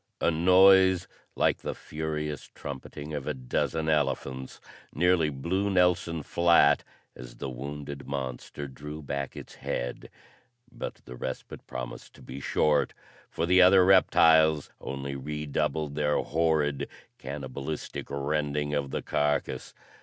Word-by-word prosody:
A - - +2
noise 95 +2 +6 0.3
like - - +2
the - - -4
furious 75 -1 -4
trumpeting 70 +2 -7
of 70 -2 -4
a - - -1
dozen 70 +5 -1
elephants 70 -3 -1 0.3
nearly 90 -3 +3
blew 90 +9 -1
Nelson 90 -4 +2
flat 85 -4 +4 0.3
as - - -10
the 65 - -5
wounded 70 +2 -7
monster 70 +1 -5
drew 75 +3 -8
back 70 -1 -4
its - - -9
head, 60 0 -4 0.6
but - - -6
the 60 - -9
respite 65 +1 -6
promised 60 -1 -7
to - - -15
be 65 - -8
short, 75 +1 +1 0.3
for 85 - -1
the 90 +2 +5
other 90 0 +7
reptiles 80 -5 +5
only 70 0 -5
re 75 +3 -4
doubled 75 +1 -1
their 75 0 +1
horrid, 75 -3 0 0.3
cannibalistic 70 +2 -5
rending 75 +1 -1
of 70 -2 -1
the - - -3
carcass. 75 0 -1
75 Hz, 130 wpm, -28 LUFS, 70-80 Hz, 0.6 s, other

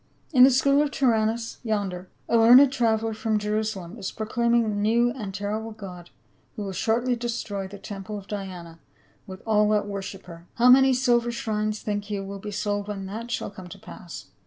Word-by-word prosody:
In 250 -2 +7
the 260 - +9
school 275 +2 +3
of 300 - +1
Tyrannus 230 -4 0
yonder, 200 -5 -3 0.2
a - - +1
learned 250 +4 +7
traveler 225 -3 +1
from 220 0 -1
Jerusalem 210 -2 -3
is 195 - -4
proclaim 235 +2 0
ing 235 -1 +3
a - - -1
new 220 +4 +2
and 215 -6 -6
terrible 210 +3 -4
god 185 -5 -10 0.5
who 210 - -5
will 195 - -4
shortly 235 +6 0
destroy 225 -5 -4
the 200 +1 -10
temple 200 +1 -7
of 200 - -9
Diana 185 -5 -7 0.5
with 190 -1 -10
all 210 -1 +3
that 210 -1 +2
worship 195 -1 -6
her. 170 0 -12
How 245 +1 +5
many 265 0 +6
silver 240 -2 +2
shrines 215 -2 -2
think 205 -1 -3
you 200 -2 -3
will 195 0 -7
be 210 - -7
sold 205 0 -2
when 200 -2 -5
that 220 +5 -6
shall 235 - -3
come 190 -3 -11
to 200 - -10
pass 185 -2 -10
215 Hz, 195 wpm, -25 LUFS, 195-235 Hz, 0.5 s, the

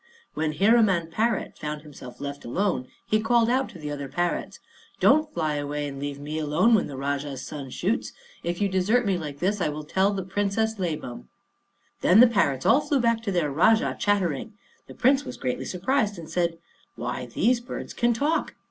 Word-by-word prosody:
When 155 0 -1
Hiraman 195 -2 +3
parrot 220 +4 -1
found 150 0 -5
himself 135 -5 -11
left 140 0 -6
alone, 150 0 -1 0.2
he 215 0 +1
called 235 +1 +3
out 260 +1 +1
to - - -11
the 150 -1 -5
other 140 -1 -4
parrots, 175 +5 -2 0.4
"Don't 310 0 +4
fly 155 -3 -1
away 145 0 -3
and 135 -1 -7
leave 140 0 -4
me 150 +2 -4
alone 160 +10 +3
when 215 - +3
the 140 - -7
Rajah's 140 -1 -3
son 140 -3 -7
shoots. 195 - -1 0.3
If 175 0 -3
you 200 - +3
desert 200 +6 +2
me 190 -3 +1
like 150 -3 -6
this, 190 +5 0
I 160 - +1
will 150 +1 -5
tell 190 +6 +1
the 195 -2 -3
Princess 205 +3 -1
Labam." 150 - -4 0.7
Then 185 +5 +6
the 245 - +10
parrots 145 - +1
all 255 +6 +5
flew 285 -2 +1
back 230 -2 +2
to 215 -3 -2
their 170 -6 0
Rajah, 220 - +3
chattering. 190 -9 0 0.3
The - - -11
Prince 270 +3 +3
was 255 -2 -7
greatly 130 +1 -3
surprised, 205 - 0
and 165 -2 -8
said, 170 0 -1 0.4
"Why, - - -4
these 245 +1 +2
birds 240 - -7
can 240 0 +2
talk!" 290 +8 0
180 Hz, 195 wpm, -26 LUFS, 150-225 Hz, 0.7 s, the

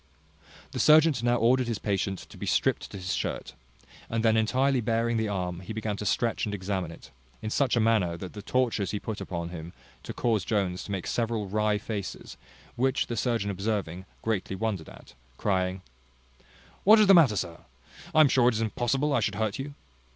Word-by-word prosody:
The - - -4
surgeon 155 +1 +6
now 120 0 +2
ordered 120 +2 +3
his 115 -2 -1
patient 100 -2 -1
to - - -12
be - - -6
stript - - +1
to - - -8
his 95 0 -3
shirt, - - -3 0.6
and 115 0 -1
then 110 0 +4
entirely 130 +4 +2
baring 115 +1 0
the 110 -1 0
arm, 90 -3 -3
he 95 +4 -7
began 110 -1 -2
to 105 - -3
stretch 115 +1 0
and 105 -1 -1
examine 95 -3 -3
it, 85 - -13 0.3
in 110 - -3
such 135 0 +2
a - - +3
manner 110 -7 +2
that 90 +1 -8
the 105 - -7
tortures 115 -4 0
he 105 - -2
put 110 0 -5
him 85 -1 -5 0.3
to - - -7
caused 110 -6 0
Jones 95 -4 0
to - - -7
make 95 -3 -3
several 115 -3 -1
wry 105 +1 +1
faces; 105 -1 -6 0.4
which 130 +1 +1
the 120 - -4
surgeon 115 -3 0
observing, 95 -3 -3 0.2
greatly 105 -3 -1
wondered 100 -5 -3
at, - - -15 0.2
crying, 95 -2 -1 1.0
"What 215 +3 +8
is 215 - +6
the 195 - +7
matter, 150 - +6
sir? 85 -3 -3 0.6
I 155 - +8
am 155 - +7
sure 125 -2 +4
it 120 - -1
is 110 - -1
impossible 130 +6 0
I 135 - +3
should 105 -2 -1
hurt 110 +3 -1
you." 140 +1 -6
110 Hz, 195 wpm, -28 LUFS, 95-120 Hz, 1.0 s, What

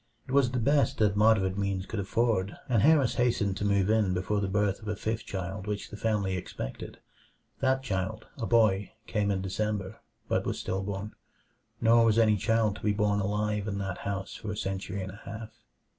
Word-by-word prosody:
It - - -7
was 135 -2 +4
the 125 - -2
best 140 +5 +2
that 105 -2 +3
moderate 100 -3 +3
means 100 -1 -1
could 110 - -4
afford, 100 -1 0
and 115 -5 +3
Harris 145 -3 +5
hastened 105 -5 +1
to - - -3
move 100 -2 +2
in 105 -4 +2
before 100 +3 0
the 100 - 0
birth 105 +1 0
of 105 - -10
a 105 - -1
fifth 110 +2 -3
child 95 +1 -4
which 105 -1 -4
the - - -6
family 105 -3 0
expected. - - -6 0.6
That 130 0 +1
child, 105 -1 -3
a 115 - -2
boy, 105 -4 +3
came 105 -2 0
in 95 -1 0
December; 100 0 -2 0.3
but - - +1
was - - -2
still 95 +1 -2
born. 100 +1 -4 0.7
Nor 115 0 +6
was 110 -1 +3
any 110 -2 +5
child 110 +1 +1
to - - -13
be 105 - +1
born 105 -1 +1
alive 105 +1 -1
in 100 -1 -2
that 95 -2 -3
house 100 -1 -4
for 110 - -7
a 105 - -5
century 95 -1 -3
and 95 - -6
a 105 - -13
half. 110 +2 -7
105 Hz, 205 wpm, -29 LUFS, 95-110 Hz, 0.7 s, Nor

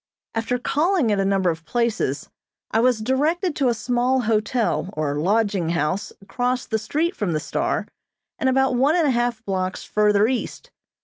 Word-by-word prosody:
After 225 +2 -1
calling 300 - +1
at 205 - +1
a 195 - +1
number 195 -2 +2
of 160 0 -7
places, 235 +6 -1 0.4
I 225 - +2
was 240 -2 +2
directed 300 - 0
to 270 - +1
a 235 - +1
small 245 +3 +1
hotel 220 -2 0
or 145 -1 -2
lodging 200 -1 +1
house 170 +4 -1
across 245 +5 -1
the 220 - -1
street 310 - -1
from 190 -5 -1
the 155 - 0
"Star," - - -2 0.5
and 265 - +2
about 265 0 +2
one 270 +6 +3
and 340 -3 +3
a - - +3
half 240 -2 -1
blocks 185 -1 -2
further 210 0 +3
east. 260 - -4
230 Hz, 175 wpm, -22 LUFS, 200-260 Hz, 0.5 s, one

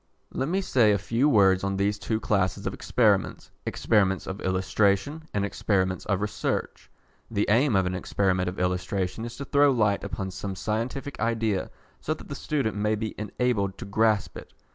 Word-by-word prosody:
Let 135 - -1
me 190 +3 +1
say 120 - +3
a 100 - +3
few 115 +9 +1
words 95 -6 +4
on 100 0 -1
these 100 +1 0
two 110 +1 -1
classes 100 -4 0
of - - -2
experiments, - - +1 0.2
Experiments 95 -4 +1
of 95 +2 -6
Illustration 100 - +1
and 100 -1 0
Experiments 95 -2 0
of 100 -2 0
Research. 105 0 -3 0.4
The 105 -2 0
aim 120 +2 +3
of 95 -1 +3
an 90 - -1
experiment 90 -1 0
of 90 - -8
illustration 90 +3 -1
is 120 0 -8
to 140 - -5
throw 145 +1 +4
light 105 -6 +2
upon 95 -1 -4
some 95 +1 -5
scientific 115 +8 -3
idea 110 -3 0 0.3
so 155 - -2
that - - -13
the - - -4
student 135 -6 -2
may 105 +1 +1
be 110 0 -4
enabled 105 -2 -1
to 120 - -7
grasp 105 0 +1
it. - - -15
105 Hz, 180 wpm, -26 LUFS, 95-115 Hz, 0.4 s, words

